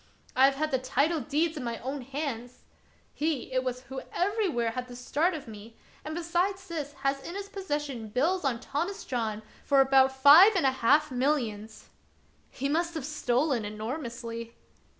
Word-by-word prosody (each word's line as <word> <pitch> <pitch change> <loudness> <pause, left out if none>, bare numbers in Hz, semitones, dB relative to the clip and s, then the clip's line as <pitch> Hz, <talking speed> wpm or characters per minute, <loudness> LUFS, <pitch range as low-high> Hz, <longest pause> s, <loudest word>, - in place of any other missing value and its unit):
I 260 - +6
have 275 0 +3
had 310 +2 -1
the 260 - +1
title 280 +6 +1
deeds 305 +5 -1
in 275 - -4
my 235 -1 -3
own 270 +3 -5
hands! 255 -2 -5 0.5
He 295 -4 -2
it 255 0 +1
was 250 -1 -3
who 265 +1 -7
everywhere 360 - 0
had 250 +2 -5
the 245 - -10
start 305 +8 0
of 295 - -8
me; 220 +1 -11 0.3
and, 310 +1 -5
besides 360 +3 -1
this, 300 -4 -5
has 275 0 +1
in 340 +6 -7
his 400 0 -6
possession 295 - -4
bills 310 - 0
on 255 -4 0
Thomas 345 +11 -3
John 220 -4 -2 0.2
for 280 -1 +3
about 265 0 +5
five 290 +11 +8
and 355 - +2
a 265 - +5
half 290 +4 +3
millions." 235 -5 -2 0.3
" - - -36
He 275 - -3
must 335 +3 0
have 305 -5 -4
stolen 270 -3 0
enormously." 230 +1 -6
275 Hz, 175 wpm, -28 LUFS, 245-315 Hz, 0.5 s, five